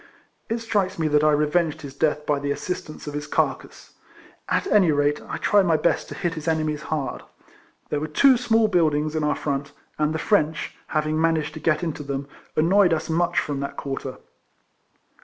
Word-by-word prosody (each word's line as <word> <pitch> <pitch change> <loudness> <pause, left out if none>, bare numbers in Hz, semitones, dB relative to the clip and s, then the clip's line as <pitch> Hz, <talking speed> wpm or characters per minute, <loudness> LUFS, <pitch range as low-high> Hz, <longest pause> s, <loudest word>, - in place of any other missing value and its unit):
It 230 - 0
strikes 210 -5 -1
me 160 -2 0
that 150 0 +3
I 155 - +5
revenged 150 +2 +1
his 140 -2 -7
death 150 +1 0
by 145 -1 +1
the 140 0 -3
assistance 155 +1 -4
of 145 - -6
his 150 +1 -4
carcase. - - -2 0.6
At - - +1
any 195 - +4
rate, 145 0 +1
I - - -3
tried 200 -3 +3
my 165 -2 +4
best 170 - 0
to - - -7
hit 175 -3 -2
his 155 -1 -7
enemies 155 -2 0
hard. 150 -4 -2 0.7
There 150 - -1
were 155 - -3
two 260 - +5
small 230 -2 +3
buildings 155 -5 +1
in 155 - 0
our 150 - +1
front; 140 0 -3 0.3
and 150 0 +2
the 160 - -1
French, 160 -2 0
having 155 0 0
managed 160 -2 +1
to - - -7
get 155 +1 +1
into 160 -2 -3
them, 140 -1 -4 0.3
annoyed 180 +3 +4
us 160 0 -2
much 170 +2 +1
from 145 -2 -3
that 140 - -5
quarter. 135 -1 -5
155 Hz, 195 wpm, -24 LUFS, 150-170 Hz, 0.7 s, I